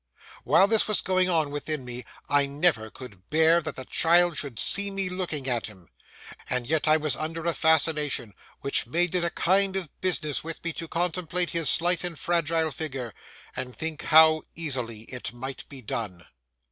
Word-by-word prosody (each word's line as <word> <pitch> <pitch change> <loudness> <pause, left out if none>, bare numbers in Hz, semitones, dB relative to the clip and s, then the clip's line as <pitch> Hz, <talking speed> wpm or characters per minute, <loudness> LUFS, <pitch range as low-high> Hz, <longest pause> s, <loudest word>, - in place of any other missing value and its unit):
While 195 - +5
this 220 +1 +2
was 215 -4 +3
going 185 -1 +2
on 160 -4 +1
within 145 -1 -4
me, 125 -1 -7 0.2
I 145 -1 +2
never 140 -6 +2
could 100 -6 -13
bear 160 +2 +4
that 155 - -6
the 130 - -7
child 175 +3 +3
should 140 -7 -5
see 200 - +3
me 195 -1 -2
looking 175 -7 -4
at 120 -3 0
him, 95 -7 -16 0.6
and 125 -1 0
yet 155 +3 0
I 155 +1 +5
was 155 -4 +1
under 160 +3 -5
a 170 - +1
fascination 150 -8 +1 0.3
which 140 - +1
made 175 +7 0
it 180 -1 +1
a 170 - 0
kind 190 +3 +2
of 185 -6 -5
business 160 -6 0
with 165 0 -6
me 170 -1 -2
to 165 - -6
contemplate 175 +1 -1
his 165 -5 +1
slight 175 +1 +2
and 175 -3 -5
fragile 165 -1 0
figure 135 -7 -5 0.4
and 125 -1 -4
think 160 -1 -4
how 155 0 +6
easily 125 -9 -3
it 125 +1 -7
might 130 +2 -7
be 135 -3 -11
done. 100 -6 -5
155 Hz, 185 wpm, -26 LUFS, 130-170 Hz, 0.6 s, how